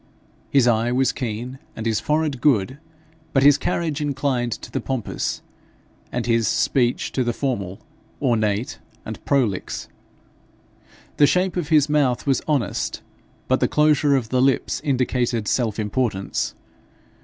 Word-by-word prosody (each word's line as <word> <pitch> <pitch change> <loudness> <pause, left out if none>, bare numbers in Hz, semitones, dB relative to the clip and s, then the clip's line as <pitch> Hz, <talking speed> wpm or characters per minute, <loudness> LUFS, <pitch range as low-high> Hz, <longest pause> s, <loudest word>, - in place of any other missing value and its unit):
His 135 -3 +4
eye 115 0 +2
was 130 +1 +2
keen, 125 +2 -5 0.2
and 110 - -6
his 110 -2 +1
forehead 150 -4 0
good, 130 -1 +2 0.5
but 135 - +3
his 145 0 +6
carriage 160 -3 -1
inclined 135 -4 -1
to - - -9
the 135 - -2
pompous, 130 -3 -3 0.7
and 120 -1 -2
his 115 -2 +2
speech 125 -2 +1
to 130 - 0
the 120 -1 -1
formal, 100 -9 -3 0.4
ornate, 110 -4 0 0.3
and - - -7
prolix. 120 -10 0 1.3
The 145 - +6
shape 185 +3 +1
of 170 -4 -2
his 155 -3 +4
mouth 140 -5 +1
was 135 -2 +2
honest, 145 -6 -1 0.4
but - - +2
the - - +2
closure 150 -1 +3
of 120 -5 -1
the 125 +1 +2
lips 135 0 +1
indicated 125 -5 0
self 115 -5 0
importance. 105 -2 -1
130 Hz, 140 wpm, -22 LUFS, 115-145 Hz, 1.3 s, his